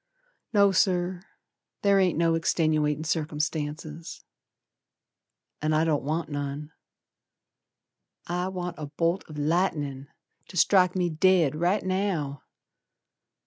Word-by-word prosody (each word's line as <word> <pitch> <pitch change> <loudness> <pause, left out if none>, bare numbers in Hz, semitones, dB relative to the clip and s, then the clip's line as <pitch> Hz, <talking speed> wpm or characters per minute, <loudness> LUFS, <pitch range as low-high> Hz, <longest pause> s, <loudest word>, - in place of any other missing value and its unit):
No, 200 -2 +5
Sir, 180 -1 +1 0.6
ther 200 -1 +4
ain't 180 -5 +2
no 165 0 +3
extenuatin' 155 -2 +1
circumstances, 155 0 -3 1.4
An' 155 +1 +1
I 155 +1 +3
don't 155 -3 +1
want 155 +4 -2
none. 145 +1 -5 1.5
I 180 +1 -2
want 180 -2 -5
a 150 - -5
bolt 165 +5 -1
o' - - -9
lightnin' 150 -3 -1 0.4
To 180 - -9
strike 180 +1 +4
me 180 -2 0
dead 165 -2 +3
right 175 +6 +1
now! 185 -7 -1
165 Hz, 105 wpm, -27 LUFS, 150-180 Hz, 1.5 s, No